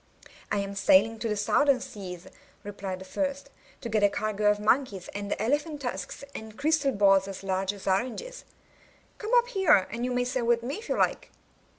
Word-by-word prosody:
*1 205 - +1
am 200 0 -6
sailing 205 +3 +4
to 230 - -2
the 210 - -1
Southern 270 +6 +3
Seas," 190 -9 -8 0.4
replied 200 -2 -5
the 190 - -10
first, 280 +5 -3 0.3
*'to 235 - -5
get 215 -1 +1
a 205 - +5
cargo 210 0 0
of 210 0 +2
monkeys, 210 -4 +1
and 205 0 -3
elephant 290 +6 -1
tusks, 195 -3 -5
and 220 0 -9
crystal 300 -2 +2
balls 195 -3 +4
as 195 0 -7
large 190 0 0
as 200 -2 -11
oranges. 250 - -2 0.8
Come 430 - -5
up 485 0 +4
here, 360 - +4
and 235 +2 -4
you 250 - 0
may 245 0 +1
sail 250 -1 -2
with 235 0 +2
me 270 +5 -3
if 460 - -11
you - - 0
like." - - 0
220 Hz, 195 wpm, -28 LUFS, 200-275 Hz, 0.8 s, a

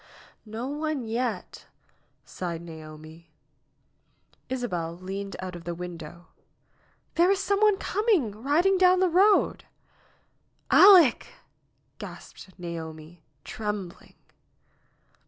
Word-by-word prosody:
"No 225 +4 -5
one 295 -2 -3
yet!" 225 -3 -4 0.6
sighed 170 -2 -5
Naomi. 160 0 -12 1.2
Isabel 180 -10 -3
leaned 195 +2 -6
out 185 -1 -6
of 170 - -9
the 170 0 -5
window. 170 -1 -9 0.9
"There 345 +2 +3
is 395 - +3
some 400 +1 0
one 425 -2 +4
coming, 405 - +1
riding 300 - +1
down 365 0 +5
the 370 -1 +3
road." 390 +5 +3 1.1
"Aleck 365 - +7 0.4
!" - - -45
gasped 190 - -11
Naomi, 165 -1 -8 0.2
trembling. 210 -5 -6
210 Hz, 100 wpm, -26 LUFS, -, 1.2 s, Aleck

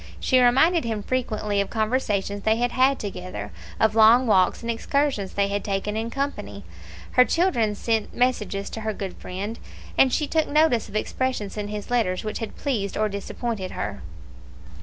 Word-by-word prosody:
She 255 - +3
reminded 270 +8 +4
him 220 -3 -3
frequently 215 -5 -1
of 200 - -3
conversations 215 -3 -1
they 220 +2 +2
had 240 +1 0
had 260 +2 +3
together, 105 - -6 0.3
of 220 -1 +3
long 225 +3 +6
walks 190 -1 +3
and 235 - -1
excursions 250 -4 -1
they 200 0 +1
had 200 0 -2
taken 200 +1 -2
in 225 +1 -2
company; 275 +3 -4 0.5
her 250 - +6
children 250 - +1
sent 225 0 -1
messages 210 -6 -1
to 225 - -5
her 215 0 -2
good 195 -2 -6
friend, 200 +5 -5 0.4
and 265 - +6
she 300 - +1
took 315 +1 +1
notice 285 -7 +2
of 205 - -11
expressions 215 -2 -2
in 210 -1 -3
his 210 +2 -6
letters 210 -7 +1
which 215 -1 -4
had 225 -3 -6
pleased 210 -8 -2
or 215 0 +1
disappointed 200 0 -4
her. 100 -1 -4
220 Hz, 175 wpm, -24 LUFS, 200-250 Hz, 0.5 s, long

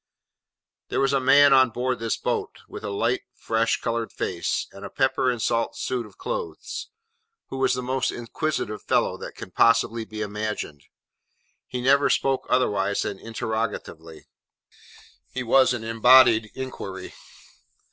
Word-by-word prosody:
There - - -2
was 135 0 +2
a 135 - +3
man 140 +2 +6
on 130 -1 +6
board 125 +2 -2
this 115 -1 -1
boat, - - -3
with - - -9
a - - -3
light 115 +5 0
fresh 115 0 0
coloured 115 0 -2
face, - - -2
and 100 - -12
a 100 - -6
pepper 130 +1 +1
and 120 -2 -1
salt 115 +1 0
suit 125 -3 -3
of - - -20
clothes, - - -5 0.6
who 135 - -5
was 130 -1 +2
the 125 - -4
most 130 +1 0
inquisitive 120 -2 -3
fellow - - +1
that - - -8
can - - -9
possibly 115 0 +3
be 110 -1 -7
imagined. 105 -8 -5 0.8
He 125 - -4
never 140 +3 +4
spoke 135 -1 +1
otherwise 100 -6 +1
than 95 - -4
interrogatively. 110 -8 -5 1.0
He 130 - -4
was 130 +2 +4
an 120 -3 -3
embodied 115 0 +5
inquiry. 95 -8 -6
115 Hz, 145 wpm, -24 LUFS, 110-130 Hz, 1.0 s, man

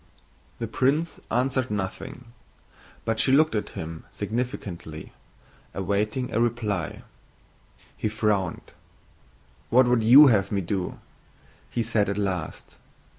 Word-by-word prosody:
The - - -3
prince 150 +6 0
answered 130 +1 0
nothing, 110 +5 -5 0.7
but 115 0 0
she 130 - +3
looked 155 +3 +4
at 105 - -2
him 80 0 -6
significantly, 100 -6 -5 0.6
awaiting 105 +6 -1
a 115 - +2
reply. 110 -8 -1 0.9
He 110 - -2
frowned. 105 -4 -1 1.0
"What 125 +2 +6
would 120 -2 +2
you 130 +7 +9
have 105 -8 +3
me 100 -1 0
do?" 90 0 -3 0.7
he 120 - -1
said 110 -3 +1
at 100 - -2
last. 95 -5 -4
110 Hz, 115 wpm, -26 LUFS, 95-125 Hz, 1.0 s, you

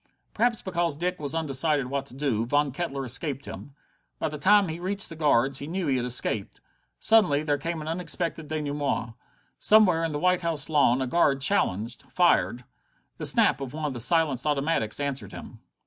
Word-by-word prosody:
Perhaps 235 +1 0
because 170 -5 -1
Dick 180 +2 -2
was 145 0 -1
undecided 150 -2 0
what 135 +1 -4
to 125 - -12
do, 135 -6 -1
Von 145 +2 +1
Kettler 140 -2 -4
escaped 140 +2 -2
him. 140 - -10 0.4
By - - -2
the 150 0 -7
time 205 +3 +4
he 160 +1 -5
reached 195 +2 0
the 165 - -9
guards 140 -4 +2
he 140 - -7
knew 180 +2 -3
he 135 -3 +1
had 125 - -2
escaped. 110 -4 -2 0.4
Suddenly 185 -10 +3
there 145 -2 0
came 165 +2 -4
an - - -9
unexpected 165 -1 -3
denouement. 145 -5 -3 0.5
Somewhere 190 -6 +5
on 165 - -1
the 145 - -3
White 180 +3 +1
House 165 -3 -1
lawn 135 -4 +3
a - - -3
guard 140 -1 +2
challenged, 120 - +1
fired. 125 -8 +2 0.5
The - - +1
snap - - +3
of 135 +1 -6
one 155 -1 -4
of 145 - -2
the 120 - -6
silenced 150 0 +2
automatics 145 -6 0
answered 140 -8 -4
him. - - -10
150 Hz, 190 wpm, -26 LUFS, 135-170 Hz, 0.5 s, Somewhere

